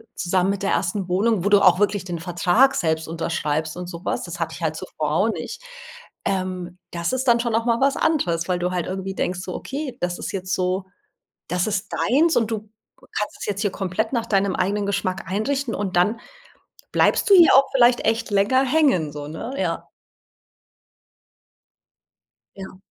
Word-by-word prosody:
zusammen 180 +2 +1
mit 200 0 -4
der 195 - +1
ersten 185 +1 -1
Wohnung, 200 +1 +1
wo 205 - +1
du 205 -1 +5
auch 185 -1 +5
wirklich 205 -2 +1
den 175 -2 -4
Vertrag 180 +10 +3
selbst 160 -1 0
unterschreibst 160 -2 -2
und 180 -1 -6
so 170 -1 -8
was, - - -1
das 175 0 -7
hatte 165 - -2
ich - - -11
halt 155 -1 0
zuvor 155 -4 -4
auch 215 +6 +3
nicht. 480 - -5 0.7
Ähm, 185 -2 -3
das 170 +5 -2
ist 260 0 -1
dann 235 0 +5
schon 235 -1 -1
auch 230 +1 0
mal 235 -1 +2
was 275 0 +3
anderes, 175 - +1
weil 180 -1 +1
du 180 +1 -1
halt 180 -2 -2
irgendwie 190 +1 -4
denkst 180 0 -2
so: 185 -1 -6
„Okay, 275 -1 -5
das 175 0 -1
ist - - -4
jetzt 190 -1 -3
so 185 +1 0 0.6
das 180 0 0
ist 205 -3 -3
deins 315 +8 +2
und 225 -2 +2
du 215 -1 -5 0.3
kannst 210 - -5
es - - -4
jetzt 200 -1 -2
hier 205 - +1
komplett 195 +5 -2
nach 230 -2 0
deinem 195 -3 +1
eigenen 205 +1 0
Geschmack 195 -2 -2
einrichten 235 +6 -1
und 195 -3 -3
dann 210 +6 +2 0.7
bleibst - - +3
du 400 - +7
hier 345 -3 +7
auch 275 - +7
vielleicht 245 -1 +4
echt 225 +1 0
länger 205 +7 +3
hängen 255 - +2
so, 145 0 -7
ne?“ 160 - -6
Ja. - - -2 2.7
Ja. 190 -1 -9
195 Hz, 190 wpm, -22 LUFS, 180-230 Hz, 2.7 s, du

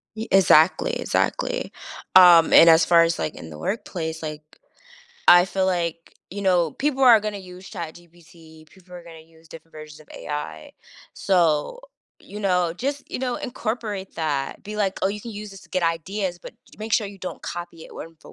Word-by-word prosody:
Ye 220 +1 -6
exactly, 185 -3 +4
exactly, - - -2 0.4
um, 175 -3 +8
and 165 - +8
as 160 0 +5
far 170 -1 +5
as, 165 0 -1
like, 80 - -3
in 80 - -10
the 75 - -10
workplace, 165 - -4
like, 155 0 -6 0.9
I 175 0 +8
feel 190 0 -1
like, 170 -2 -3 0.2
you 200 +1 -6
know, 175 -4 +2
people 275 -1 -2
are 235 -3 +8
gonna 210 -1 -4
use 185 +1 -12
ChatGPT, 165 -3 -12
people 185 +1 -21
are 175 - -10
gonna 165 -1 -13
use 160 0 -22
different 165 0 -14
versions 155 0 -12
of 155 - -19
AI, 115 - -7 0.4
so, 175 - +1 0.4
you 205 - -9
know 180 -4 +1
just, 280 +7 -4
you - - -4
know, 250 -1 -2
incorporate 220 -5 -5
that, 145 -4 -3
be 210 +1 -7
like, 200 -3 -1
"Oh, 190 - +2
you 210 +1 -5
can 230 0 -9
use 210 0 -8
this 195 -1 -12
to - - -19
get 185 -1 -1
ideas, 175 +3 -2
but - - -12 0.2
j - - -17
make 215 0 -7
sure 215 - +2
you 200 -1 -13
don't 185 - -7
copy 170 0 -7
it - - -14
word 165 - -8
for - - -15
175 Hz, 195 wpm, -23 LUFS, 160-205 Hz, 0.9 s, um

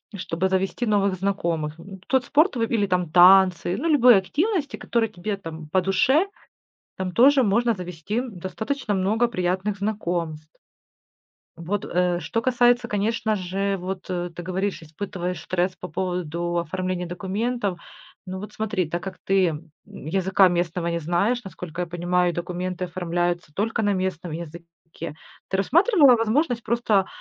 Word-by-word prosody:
чтобы 185 -1 -2
завести 190 +5 0
новых 200 -3 +2
знакомых. 170 -5 -2
Ну, 190 +3 -11
тот 260 -2 +2
спорт 310 +5 +3
в 235 - -2
или 225 -2 +1
там 180 -3 0
танцы, 180 +1 +6
ну, 320 - -2
любые 250 -8 +7
активности, 300 - -1
которые 230 -2 0
тебе 200 +3 -4
там 160 -4 -8
по 185 +4 +2
душе. 260 - +3 0.7
Там 185 -1 -3
тоже 270 +4 +6
можно 235 +3 +2
завести 180 +3 -4
достаточно 220 +3 -4
много 205 +5 +2
приятных 190 -1 -1
знакомств. 175 -7 -3 1.1
Вот, 180 +4 -3
э, 180 0 +1
что 230 - -2
касается, 245 -1 +3
конечно 215 +1 0
же, 195 +1 -1
вот, 185 0 -6
э, 175 -1 -2
ты 175 - -6
говоришь, 190 +2 -2
испытываешь 180 +1 -5
стресс 180 +1 -1
по 180 - -8
поводу 175 -2 -2
оформления 180 +2 -2
документов. 195 +2 -2 0.5
Ну 185 0 -5
вот 210 - -8
смотри, 210 -5 -1
так 175 +1 -3
как 190 -1 -6
ты, 190 -1 +3
м, 160 0 -5 0.2
языка 190 +4 +2
местного 175 0 -1
не 170 0 -1
знаешь, 185 +10 0
насколько 180 -3 -7
я 175 - -2
понимаю, 175 +1 +1
и - - -10
документы 180 +1 -3
оформляются 175 -1 -2
только 225 +6 -1
на 205 -1 +2
местном 185 -3 -3
языке. 165 0 -9 0.3
Ты 190 - 0
рассматривала 305 - +5
возможность 235 +2 0
просто 220 -4 +1
185 Hz, 150 wpm, -24 LUFS, 175-215 Hz, 1.1 s, любые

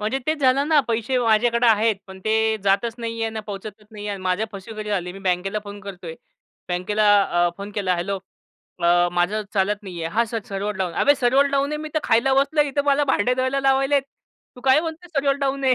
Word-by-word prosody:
म्हणजे 220 +6 -1
तेच 310 0 0
झालं 275 +3 +3
ना 305 -2 +5
पैसे 235 +3 0
माझ्याकडे 235 +1 +2
आहेत 220 -1 +3
पण 190 0 -11
ते 220 0 +1 0.3
जातच 200 +4 +1
नाही 230 -1 -4
आहे - - +2
आणि 220 0 -5
पोहचतच 205 +1 -8
नाही 210 -1 -8
आहे 205 - -2
आणि 190 - -9
माझ्या 185 +4 0
फसवेगिरी 210 +2 -7
झाली. 180 -3 -2
मी 195 - -10
बँकेला 195 +2 -1
फोन 205 0 -9
करतोय. 180 -4 -8 0.5
बँकेला 205 +4 0 0.2
अ, 175 -2 +1
फोन 200 +1 -7
केला, 190 -3 0
"हेल्लो 195 +3 -2 0.6
अ, 175 +1 +4
माझं 180 +5 0
चालत 205 +2 0
नाही 180 -4 -7
आहे." 165 - -4
"हा 235 +2 +3
सर 225 0 -4
सर्वर 200 +1 -3
डाऊन." 185 -3 -2
अबे 285 - +5
सर्वर 265 +2 +3
डाऊन 280 +1 +1
आहे - - -1
मी 310 - -5
तर - - +3
खायला 265 +4 +3
बसलो 285 +3 +2
इथं 285 +1 -1
मला 285 0 +3
भांडे 250 -2 +1
धुवायला 260 +2 0
लावायलेत 270 +1 +2 0.5
तू - - -11
काय 265 +3 +4
म्हणतो? 330 +2 -6
सर्वर 275 -3 +1
डाऊन 275 -1 -2
आहे. 260 -1 +4
220 Hz, 215 wpm, -22 LUFS, 195-270 Hz, 0.6 s, ना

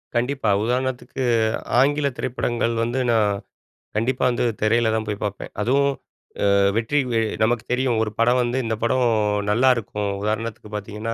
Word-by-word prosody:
கண்டிப்பா. 125 -1 0
உதாரணத்துக்கு 130 +2 -2 0.6
ஆங்கில 145 +2 +3
திரைப்படங்கள் 120 -1 -1
வந்து, 120 +3 -1
நான் 110 -3 +3 0.7
கண்டிப்பா 120 +4 0
வந்து 120 - 0 0.2
திரையில 115 +1 +2
தான் 110 0 -1
போய் 105 -1 -3
பாப்பேன். 105 -1 -4
அதுவும் 140 +6 +2 0.6
அ - - +4 0.2
வெற்றி 115 +6 +1
வெ 115 - +2 0.2
நமக்கு 115 0 +1
தெரியும் 125 -2 +1
ஒரு 105 - -3
படம் 120 +2 +4
வந்து, 120 +1 -1
இந்த 110 0 -1
படம் 125 +2 +2 0.5
நல்லாயிருக்கும், 115 -3 +1
உதாரணத்துக்கு 110 0 -3
பாத்தீங்கன்னா, 105 +2 -4
115 Hz, 140 wpm, -22 LUFS, 110-125 Hz, 0.7 s, அ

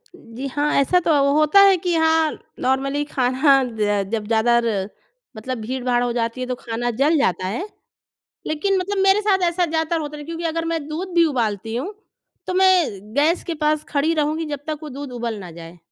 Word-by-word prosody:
जी 255 -4 -8
हाँ, 290 +2 -1
ऐसा 320 +6 +3
तो 335 - 0 0.2
होता 305 +6 +4
है 395 -1 +6
कि 355 0 -2
हाँ, 320 -1 +3 0.3
नॉर्मली 275 +3 0
खाना 270 +1 +3
ज 205 -1 +1
जब 220 -2 -2
ज़्यादा 230 +2 +3
र 205 -3 -1 0.5
मतलब 255 +4 -4
भीड़-भाड़ 245 +1 -1
हो 245 - -1
जाती 230 +1 -2
है 255 - -3
तो 250 - -2
खाना 240 0 -4
जल 310 +3 +4
जाता 185 - 0
है। 235 - -3 0.8
लेकिन 380 +6 0
मतलब 395 +2 -2
मेरे 390 +2 +5
साथ 395 -3 +2
ऐसा 350 +1 0
ज़्यादातर 320 +1 -1
होता 300 -1 -6
नहीं। 295 0 -9
क्योंकि 335 0 -6
अगर 330 0 -1
मैं 330 0 -1
दूध 350 +5 -5
भी 340 -1 +5
उबालती 225 - -2
हूँ, 350 +12 -4 0.5
तो 370 - -3
मैं 345 - +2
गैस 305 +5 +2
के 335 - -3
पास 305 0 +1
खड़ी 300 +3 +1
रहूँगी 310 +1 0
जब 275 - -8
तक 310 -1 -3
वो 305 - -6
दूध 275 0 -7
उबाल 235 -3 -4
ना 180 - -9
जाए। 165 +1 -11
290 Hz, 200 wpm, -21 LUFS, 240-330 Hz, 0.8 s, है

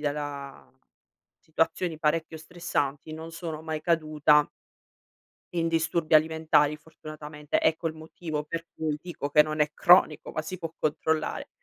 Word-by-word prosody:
della 145 -2 -4 0.7
situazioni 165 +1 -1
parecchio 160 +1 0
stressanti 155 -3 -3
non 160 +1 -7
sono 165 -2 -6
mai 160 -1 -3
caduta 155 -2 +3 1.1
in 165 -1 +1
disturbi 165 0 +1
alimentari, 155 -1 +4
fortunatamente. 150 -1 -5
Ecco 160 +1 +1
il 155 - -2
motivo 155 -1 -5
per 165 +2 -5
cui 155 -2 -2
dico 165 -5 -5
che 150 +1 +7
non 155 0 -4
è 150 0 +3
cronico, 175 -4 +4
ma 155 - -2
si 185 +3 -6
può 165 -2 -5
controllare. 155 +1 -1
155 Hz, 135 wpm, -27 LUFS, 150-165 Hz, 1.1 s, che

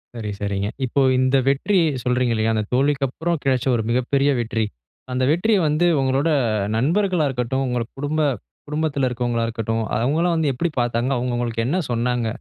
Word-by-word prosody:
சரி, 110 -3 -5
சரிங்க. 100 0 -1 0.2
இப்ப, 130 +3 -1 0.2
இந்த 130 +1 +3
வெற்றி 140 +9 +1 0.3
சொல்றீங்கல்லயா? 120 -3 +1
அந்த 110 -1 0
தோல்விக்கப்புறம் 140 +5 0
கிடைச்ச, 130 -2 +1
ஒரு 115 - -1
மிகப்பெரிய 130 +4 +1
வெற்றி. 115 -1 -1 0.5
அந்த 125 0 0
வெற்றிய 205 +7 +2
வந்து, 155 +4 +2 0.2
உங்களோட 135 +4 +1 0.5
நண்பர்களா 175 - +1
இருக்கட்டும். 130 +1 -1
உங்க 125 -2 -1
குடும்ப, 150 +2 -1 0.5
குடும்பத்தில 150 -3 0
இருக்கிறவங்களா 120 -1 -1
இருக்கட்டும். 115 0 -2 0.2
அவுங்களா 155 +9 +1
வந்து 160 -3 +1
எப்டி 165 +7 -1
பாத்தாங்க? 120 +2 0
அவுங்க 120 0 -1
உங்களுக்கு 115 -1 -2
என்ன 160 +8 0
சொன்னாங்க? 120 0 0
130 Hz, 150 wpm, -22 LUFS, 120-145 Hz, 0.5 s, இந்த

